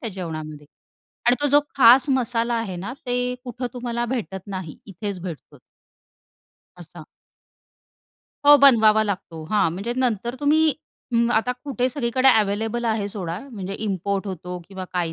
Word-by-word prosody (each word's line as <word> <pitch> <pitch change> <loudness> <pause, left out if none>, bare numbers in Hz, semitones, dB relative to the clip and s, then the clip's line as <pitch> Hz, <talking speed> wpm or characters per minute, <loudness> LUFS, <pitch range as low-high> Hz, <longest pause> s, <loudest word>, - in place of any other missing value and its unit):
त्या 230 - -4
जेवणामध्ये 155 -5 -7 0.6
आणि 245 - +5
तो 290 - +2
जो 290 +2 +5 0.2
खास 255 +2 +7
मसाला 240 -2 0
आहे 225 -6 -3
ना, 195 +8 -5
ते 245 0 -1
कुठं 250 0 -5
तुम्हाला 240 -1 -3
भेटत 215 -7 -4
नाही. 185 -6 -6
इथेच 200 -1 -6
भेटतो. 170 -5 -8 1.2
असा. 175 -1 -12 1.4
हो, 290 0 +10
बनवावा 220 -5 +6
लागतो. 185 -5 -5
हां, 210 -6 +2
म्हणजे 200 +7 -4
नंतर 240 -1 -1
तुम्ही 305 +1 +3 0.4
अं, 235 0 +3
आता 240 +2 +1
कुठे 255 -3 -1
सगळीकडे 260 -1 +1
अवेलेबल 220 +3 -1
आहे 220 -3 0
सोडा 180 -4 -4
म्हणजे 195 -4 -6
इम्पोर्ट 200 0 -2
होतो 180 -1 -6
किंवा 190 -1 -7
काही 175 -2 -1
220 Hz, 145 wpm, -23 LUFS, 185-245 Hz, 1.4 s, हो